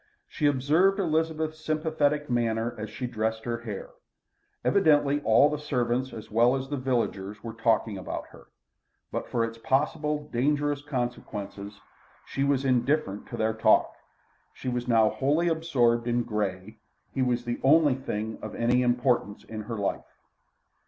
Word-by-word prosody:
She 150 - 0
observed 150 +8 +3
Elizabeth's 160 -2 -1
sympathetic 155 -2 0
manner 115 -1 0
as 110 -1 -6
she 125 - -5
dressed 110 -2 -2
her 120 -1 -2
hair. 110 -4 -7 0.7
Evidently 145 -6 +3
all 115 +3 +5
the 150 -1 -2
servants 130 -3 -1
as 110 -2 -9
well 120 +4 +4
as 135 0 -4
the 145 - -2
villagers 105 -6 -2
were 115 -1 -6
talking 115 -3 +1
about - - -5
her. - - -16 0.6
But - - -3
for 115 -1 +1
its 115 0 -8
possible, 150 +3 0
dangerous 145 +3 +1
consequences, 105 -7 -5 0.5
she 135 - -2
was 140 -1 +1
indifferent 125 -4 +1
to - - -6
their 110 0 +1
talk. 110 - +3 0.6
She 130 - -4
was 125 0 -2
now 115 -2 +5
wholly 145 +9 +1
absorbed 125 -8 +1
in 120 0 +1
Grey; 105 -1 -3 0.3
he 135 - -1
was 120 -1 0
the 120 0 -3
only 150 0 +5
thing 110 -4 -4
of - - -7
any 120 +2 +2
importance 120 -4 +1
in 110 -1 -7
her 115 - -3
life. 100 -1 -3
125 Hz, 150 wpm, -27 LUFS, 115-145 Hz, 0.7 s, all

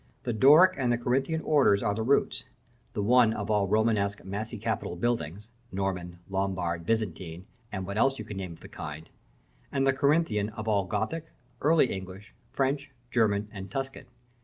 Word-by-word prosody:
The 120 - -1
Doric 150 - +7
and 125 -2 +2
the 120 - +2
Corinthian 135 +7 0
orders 135 -12 +3
are 105 - +1
the 110 - -3
roots, 130 +5 +1 0.5
the 105 - -1
one 120 0 +5
of - - -3
all 105 -2 +2
Romanesque, 105 -1 +1
massy 105 +4 -4
capitaled 85 - -3
buildings 105 -3 -2 0.2
Norman, 90 -2 -3
Lombard, 95 -4 -2
Byzantine, 95 -6 -2 0.3
and 95 -2 -4
what 100 +3 -3
else 135 +2 +3
you - - -6
can 100 - -7
name 95 -3 -5
of - - -16
the - - -10
kind; 75 +2 -7 0.6
and 135 -1 +1
the 135 - +4
Corinthian 140 -7 +2
of 110 0 -7
all 100 -3 +2
Gothic, 110 - -2 0.4
Early 155 -2 +4
English, 95 +2 -8 0.2
French, 140 +1 0 0.2
German, 105 -3 +2
and 95 -2 -7
Tuscan. 135 +5 -5
105 Hz, 170 wpm, -28 LUFS, 95-130 Hz, 0.6 s, Doric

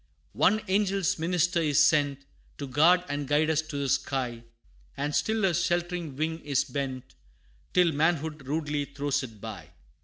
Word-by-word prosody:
One 215 +3 +3
angel 195 0 +1 0.2
minister 175 +1 +1
is 150 -3 +2
sent, 145 -3 +1 0.3
To 140 - -5
guard 160 +7 +4
and 145 -1 -3
guide 150 +2 +2
us 155 -1 +2
to 155 -2 -7
the 140 -1 -1
sky, 125 -3 -1 0.6
And 145 +2 -2
still 220 -1 0
Her 190 -2 +3
sheltering 175 -2 -1
wing 160 +3 -2
is 140 -4 0
bent, 130 -1 -5 0.6
Till 180 -2 +5
manhood 155 -2 -1
rudely 150 -1 -1
throws 145 0 -2
it 115 -5 -9
by. 100 -7 -8
150 Hz, 155 wpm, -28 LUFS, 140-170 Hz, 0.6 s, Till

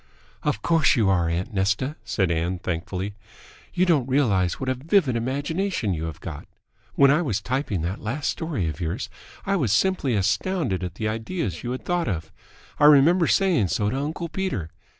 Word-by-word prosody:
"Of 105 - -1
course 165 -2 +4
you 110 -6 +3
are, 90 -3 +2
aunt 90 +7 -2
Nesta," 100 +9 0
said 95 -5 0
Ann 85 +3 -1
thankfully. 90 +3 -4 0.6
"You 180 +1 +2
don't 145 -8 +2
realise 100 -10 +2
what 130 - -4
a 130 - +2
vivid 145 - +1
imagination 140 - -1
you 80 -1 -3
have 80 -3 -6
got. - - -8 0.5
When 140 0 +6
I 150 +4 +3
was 110 - -1
typing 125 - -2
that 90 +5 -3
last 135 +7 -1
story 155 - -2
of 80 0 -5
yours, 85 +9 -3 0.3
I 200 0 +1
was 130 - 0
simply 140 - +2
astounded 105 - 0
at 90 -1 -5
the 110 +1 -2
ideas 110 - -3
you 120 - -5
had 130 +1 -4
thought 175 -1 0
of. 80 -6 -3 0.5
I - - +5
remember 150 +4 +6
saying 180 - +3
so 105 +4 0
to 130 - -2
uncle 155 +4 -3
Peter. 160 - -3
120 Hz, 185 wpm, -24 LUFS, 95-155 Hz, 0.6 s, When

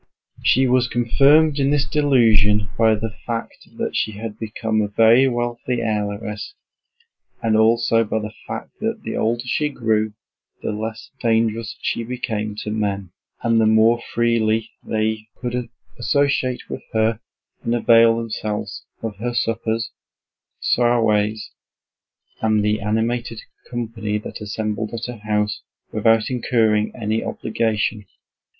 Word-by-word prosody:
She 130 +1 +4
was 125 -1 +3
confirmed 140 +6 +4
in 135 0 +2
this 145 0 +2
delusion 110 -8 +3
by 110 -1 +4
the 110 0 -4
fact 115 -1 -5
that - - -2
she 110 - 0
had 105 +1 -7
become 110 0 -1
a 105 - 0
very 115 +5 +5
wealthy 120 0 -2
heiress 105 - -3 0.9
and 110 -1 +2
also 115 +1 +4
by 110 0 -2
the 105 0 -4
fact - - -5
that - - -3
the - - -4
older 115 +2 0
she 150 +4 0
grew 110 -5 0 0.5
the - - -1
less 110 +1 -5
dangerous 115 -1 0
she 115 - -1
became 110 -3 -3
to 105 - -4
men, 100 -4 -2 0.3
and 115 -1 +3
the 110 - +4
more 110 +2 +4
freely 115 -1 +1
they 110 0 -1
could 125 -1 -3 0.3
associate 130 0 +1
with - - -6
her 110 0 +2 0.4
and 115 - 0
avail 115 -1 +5
themselves 110 -2 -4 0.2
of 110 -3 -4
her 120 +3 -3
suppers, 115 0 -1 0.7
soirees, 110 -3 +2 0.9
and 110 -2 +2
the 105 0 +1
animated 115 +2 -1 0.3
company 115 -3 -3
that 105 - -8
assembled 105 +1 -3
at 115 - -4
her 125 -2 -7
house, 105 0 0 0.3
without 110 +1 +2
incurring 110 -4 +2
any 110 -1 -1
obligation. 110 -2 -1
115 Hz, 130 wpm, -21 LUFS, 110-120 Hz, 0.9 s, very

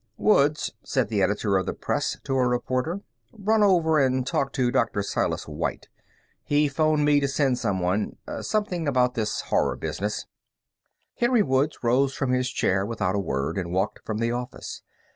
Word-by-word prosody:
"Woods," 150 -7 +3
said 130 -6 0
the 105 -3 0
editor 100 +1 +1
of 95 - -4
the - - -2
Press - - -1
to 135 - -3
a 130 -1 +3
reporter, 130 +8 -1 0.3
"run 215 0 +1
over 170 -6 +4
and 130 -2 +2
talk 135 0 0
to 125 -3 +1
Dr. 100 - +1
Silas - - -1
White. - - -4 0.5
He 150 +1 +2
phoned 150 +1 +2
me 145 -1 +5
to 140 - 0
send 135 -2 +1
someone. 95 -1 -1 0.2
Something 185 -7 -1
about 125 -2 +2
this 110 -3 -1
Horror - - +1
business." 105 +2 -3 0.9
Henry 240 -2 +3
Woods 135 +2 0
rose 130 +3 +2
from 135 -4 -1
his 125 0 +1
chair 95 -5 +1
without 100 -3 -1
a 100 - 0
word 70 0 -2
and 85 -2 -4
walked 95 +4 -1
from 110 - -3
the 115 +1 0
office. 125 +1 -5
130 Hz, 170 wpm, -25 LUFS, 105-150 Hz, 0.9 s, me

